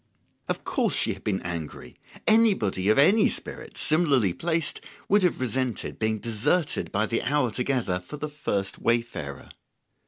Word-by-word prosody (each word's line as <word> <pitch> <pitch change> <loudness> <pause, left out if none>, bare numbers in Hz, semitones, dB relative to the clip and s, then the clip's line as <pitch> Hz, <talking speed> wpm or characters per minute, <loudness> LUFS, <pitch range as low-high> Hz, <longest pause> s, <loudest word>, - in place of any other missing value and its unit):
Of - - -2
course - - 0
she - - +1
had - - -14
been 95 -3 -1
angry; 85 -7 -6 0.3
anybody 190 - +3
of 110 - +4
any 200 +10 +5
spirit, - - -5
similarly 140 - +3
placed, 165 - -1 0.3
would 205 +1 +4
have 180 -2 +1
resented 130 -1 -2
being 110 0 0
deserted 115 - 0
by 105 +2 +1
the 115 +1 -1
hour 140 -3 +1
together 125 -6 -1
for 90 +11 -9
the 150 - -4
first 100 -10 -3
wayfarer. 115 -13 -2
120 Hz, 150 wpm, -26 LUFS, 100-150 Hz, 0.3 s, any